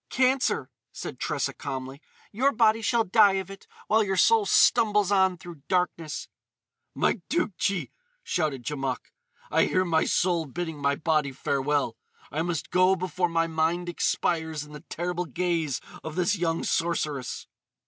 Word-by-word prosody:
"Cancer," 260 +1 +1 0.2
said - - -7
Tressa - - -1
calmly. 135 0 -6 0.3
"Your 260 +7 +2
body 225 -2 +3
shall 230 +1 +2
die 205 0 +5
of 190 0 -3
it 195 - -12 0.2
while 220 +1 +3
your 195 -2 -1
soul 445 - +4
stumbles 210 -3 +4
on 190 -2 +3
through 170 -3 -11
darkness." 180 -4 -1 0.7
"My 210 - +1
Tougtchi!" 200 - -1 0.3
shouted 150 -7 -1
Djamouk, 135 -3 -3 0.4
"I - - +4
hear 185 0 +1
my 160 -2 +2
soul 175 -3 +1
bidding 160 0 -5
my 140 0 +2
body 155 -2 +1
farewell! 140 -2 -1 0.3
I 155 - -1
must 170 -1 -3
go 185 +1 +4
before 180 0 -1
my 165 0 +1
mind 165 +2 0
expires 160 -3 -1
in 150 0 -13
the 150 - -9
terrible 180 +1 -2
gaze 165 -3 -1 0.2
of 160 -1 -6
this 180 +3 +2
young 170 -3 -1
sorceress!" 150 -6 -1
175 Hz, 150 wpm, -27 LUFS, 150-190 Hz, 0.7 s, die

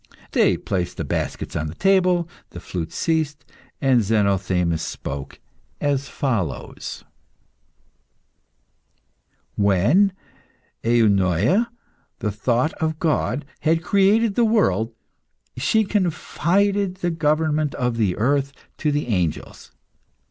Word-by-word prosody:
They - - +3
placed 90 -3 -3
the - - -2
baskets - - -3
on 80 - -1
the 75 - -7
table, 185 -3 +3 0.2
the 85 - -9
flute 85 -2 -5
ceased, 160 -3 -1 0.3
and 130 -3 +3
Zenothemis 95 -5 +1
spoke 70 0 -6 0.4
as 140 -1 0
follows 95 - -3 2.5
"When 105 - +3 0.7
Eunoia, 110 - +3 0.5
'the 105 - -2
thought 120 +8 0
of 160 -1 0
God,' 150 -4 0
had 165 +1 +1
created 200 +4 +3
the 240 - +2
world, 115 - +2 0.6
she 220 - +2
confided 195 0 0
the 175 -2 -2
government 155 -1 +1
of 125 -3 -1
the 100 -6 +1
earth 140 +4 +1 0.3
to 150 - +1
the 145 +1 -1
angels. 90 -9 -3
140 Hz, 105 wpm, -22 LUFS, -, 2.5 s, They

